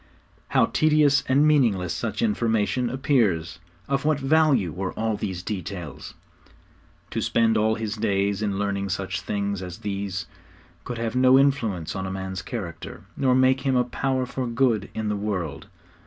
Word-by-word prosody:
How - - +3
tedious 150 -3 +3
and 140 +3 +4
meaningless 110 - +2
such 115 - -3
information 120 - +1
appears! 105 - +1 0.3
Of 140 0 0
what 155 -1 +2
value 135 - +3
were 90 +3 -4
all 110 -1 -1
these 95 -4 -4
details? 90 -6 -6 1.0
To - - -2
spend 115 -1 +2
all 110 +1 +2
his 110 -1 -4
days 100 -1 0
in 100 -2 -1
learning 100 -1 -1
such 95 0 -3
things 100 -1 -2
as 90 0 -7
these 100 -3 -4 0.6
could 120 - -5
have 115 0 -3
no 130 +1 +6
influence 115 - +1
on 95 0 -3
a - - -4
man's 95 -1 -4
character, 90 -6 -7
nor 130 -2 +2
make 130 +1 +3
him 135 -1 +1
a 125 - +4
power 130 +1 -1
for 125 0 -4
good 115 -4 +1
in 110 -1 -2
the 105 - 0
world. 95 -8 -3
110 Hz, 160 wpm, -24 LUFS, 95-130 Hz, 1.0 s, no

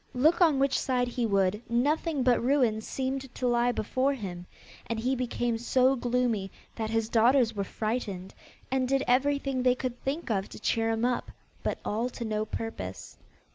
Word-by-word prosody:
Look 310 +8 +3
on 320 -5 +5
which 270 0 +2
side 250 -2 0
he 240 -1 -1
would, 200 0 +1
nothing 285 +4 +1
but 245 -2 +3
ruin 245 -5 +2
seemed 265 +2 -3
to 255 - -1
lie 240 0 +3
before 260 +4 0
him, 180 -7 -7 0.4
and 230 -1 -2
he 255 +4 0
became 240 -2 -1
so 255 +2 +3
gloomy, 240 -5 0 0.3
that 220 -1 -3
his 225 0 0
daughters 235 +1 +4
were 200 - -1
frightened, 205 -3 -3 0.4
and 260 -1 +1
did 270 +1 +2
everything 275 +1 +2
they 250 0 +4
could 250 -1 -4
think 280 0 -3
of 195 -2 -1
to - - -10
cheer 225 +1 +1
him 225 +1 0
up, 245 -1 -1 0.3
but - - -1
all 230 +4 -1
to 235 - -6
no 215 -1 -1
purpose. 215 - -6
245 Hz, 175 wpm, -28 LUFS, 220-260 Hz, 0.4 s, on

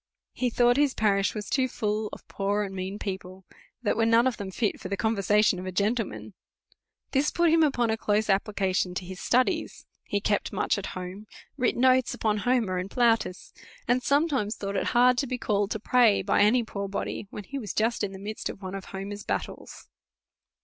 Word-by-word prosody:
He 250 - 0
thought 245 +1 +3
his 285 -2 +2
parish 200 -2 +1
was 210 -1 -5
too 260 -2 +1
full 215 -2 -2
of - - -11
poor 200 +1 -1
and 195 -1 -5
mean 190 +2 -4
people, 190 -2 -6 0.4
that 210 - +1
were 225 +1 +2
none 230 +1 +5
of 260 -2 0
them 200 -2 -5
fit 210 +2 -1
for 185 - -6
the 200 - -2
conversation 210 -3 +2
of 185 - -6
a - - -3
gentle 210 +5 +1
man. - - -9 0.8
This 275 +2 +2
put 340 -2 +2
him 325 0 +4
upon 245 -7 +2
a 220 - 0
close 210 0 +1
application 195 -2 0
to 180 - -4
his 185 +1 -8
stu 255 +1 +3
dies. - - -4 0.2
He 205 - -1
kept 205 0 0
much - - 0
at 195 - -5
home, 185 +4 -7 0.3
writ 255 -4 0
notes 255 0 +3
upon 215 -1 0
Homer 225 -6 +1
and 185 +2 -4
Plautus, 230 -5 +1 0.3
and 250 +1 +2
sometimes 280 -7 +1
thought 200 0 -4
it - - 0
hard 250 0 +5
to 275 - -1
be 250 0 -2
call 205 -3 0
ed - - -12
to 220 - -3
pray 230 -2 +4
by 195 - +2
any 235 +4 +4
poor 200 -3 -5
body, 195 +1 -4
when 210 - -7
he 275 +8 -6
was 215 -5 -5
just 225 +1 0
in 200 - -1
the 190 - -8
midst 210 +3 -5
of - - -8
one 185 0 -5
of 195 -1 -6
Homer's 200 +1 -6
battles. - - -5
210 Hz, 215 wpm, -27 LUFS, 195-245 Hz, 0.8 s, none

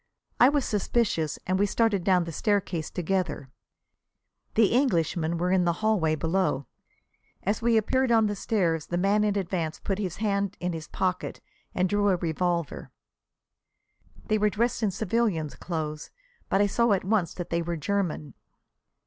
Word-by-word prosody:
I 250 - +8
was 285 -2 +1
suspicious 200 -7 0
and 185 +1 0
we 205 - +3
started 210 -3 +1
down 180 -1 +3
the 165 - -6
staircase 185 -3 -1
together. 180 -6 -2 1.0
The 220 0 +4
'Englishmen' 170 - +1
were 180 +2 0
in 185 -1 +3
the 170 -1 +2
hallway 170 -8 +2
below. 160 -4 0 0.8
As 205 +4 0
we 230 0 +3
appeared 260 +4 +1
on 225 -1 +5
the 205 0 -1
stairs 170 -7 0
the 175 - -2
man 200 +3 +2
in 210 -1 +1
advance 170 -4 -2
put 195 0 -2
his 185 -4 -3
hand 200 -2 -1
in 180 0 -2
his 160 -2 -6
pocket 185 -1 -2 0.4
and 185 +1 +2
drew 205 +1 +2
a 190 - +4
revolver. 170 -1 -2 1.4
They 215 -1 +1
were 210 0 +3
dressed 230 +4 0
in 215 - +2
civilians' 195 -6 -1
clothes, 155 -3 -5 0.4
but 195 - +3
I - - +5
saw 235 +2 +2
at 190 - 0
once 195 -3 0
that 175 - -6
they 170 0 +1
were 170 0 -3
German. 160 -5 -2
190 Hz, 165 wpm, -27 LUFS, 170-210 Hz, 1.4 s, I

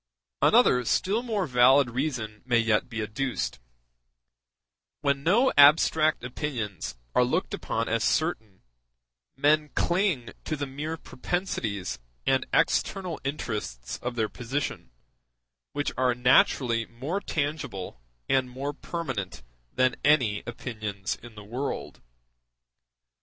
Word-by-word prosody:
Another 125 0 +5
still 200 - +1
more 220 -6 -1
valid 130 -1 +5
reason 120 -5 -3
may 120 -1 +2
yet 115 0 +2
be 115 -2 -3
adduced: 105 - -3 1.4
when 140 -1 +1
no 220 - +3
abstract 155 +1 +5
opinions 120 - -4 0.2
are 125 - +4
looked 160 +9 -1
upon 115 +1 -2
as 115 0 0
certain, 110 - -1 0.7
men 150 +2 +3
cling 175 - +1
to 155 - -2
the 145 -1 -3
mere 150 +4 -5
propensities 110 - -3 0.3
and - - +2
external 185 -4 +1
interests 105 - -4
of 125 0 -3
their 110 -2 +1
position, 125 - -4 0.8
which 145 0 -1
are 125 -1 +3
naturally 125 -2 +3
more 135 +11 -3
tangible 140 - -3 0.3
and 130 -1 +2
more 135 +3 -4
permanent 130 - -5 0.3
than 130 0 +2
any 130 -9 +3
opinions 110 -5 -4
in 120 -1 -12
the 105 - -10
world. 125 +7 -5
125 Hz, 115 wpm, -27 LUFS, 115-150 Hz, 1.4 s, Another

